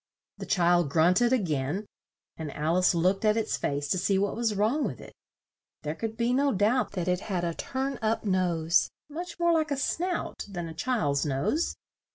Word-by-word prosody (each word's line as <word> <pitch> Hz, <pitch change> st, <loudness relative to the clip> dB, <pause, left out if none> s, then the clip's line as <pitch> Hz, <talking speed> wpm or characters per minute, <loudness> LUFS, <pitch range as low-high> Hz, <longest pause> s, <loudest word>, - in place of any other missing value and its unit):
The -, -, -6 dB
child 175 Hz, -4 st, +3 dB
grunt 170 Hz, +7 st, +4 dB
ed 240 Hz, 0 st, +3 dB
a 260 Hz, -, +5 dB
gain 160 Hz, -, -2 dB, 0.5 s
and 155 Hz, -3 st, -6 dB
Al 155 Hz, +3 st, 0 dB
ice 180 Hz, -1 st, +3 dB
looked 185 Hz, +4 st, +2 dB
at 215 Hz, 0 st, +3 dB
its 220 Hz, -1 st, 0 dB
face 145 Hz, 0 st, -2 dB
to 185 Hz, -, +1 dB
see 195 Hz, +2 st, +2 dB
what 200 Hz, +1 st, 0 dB
was 225 Hz, -2 st, 0 dB
wrong 225 Hz, +9 st, +1 dB
with -, -, -3 dB
it. -, -, -12 dB, 0.7 s
There 150 Hz, 0 st, -2 dB
could 225 Hz, +5 st, -5 dB
be 240 Hz, +1 st, +1 dB
no 280 Hz, +2 st, +3 dB
doubt 220 Hz, +5 st, +1 dB
that 180 Hz, -3 st, -3 dB
it 180 Hz, 0 st, +1 dB
had 185 Hz, -3 st, -3 dB
a 170 Hz, -1 st, -1 dB
turn 270 Hz, +8 st, -3 dB
up 220 Hz, 0 st, 0 dB
nose, 180 Hz, -3 st, +2 dB, 0.2 s
much 340 Hz, +3 st, -7 dB
more 340 Hz, 0 st, +3 dB
like 315 Hz, -2 st, +1 dB
a 285 Hz, -, -1 dB
snout 345 Hz, +6 st, -2 dB
than 175 Hz, -4 st, -5 dB
a 165 Hz, -, -7 dB
child's 160 Hz, -, 0 dB
nose. 145 Hz, -, 0 dB
195 Hz, 205 wpm, -28 LUFS, 170-250 Hz, 0.7 s, a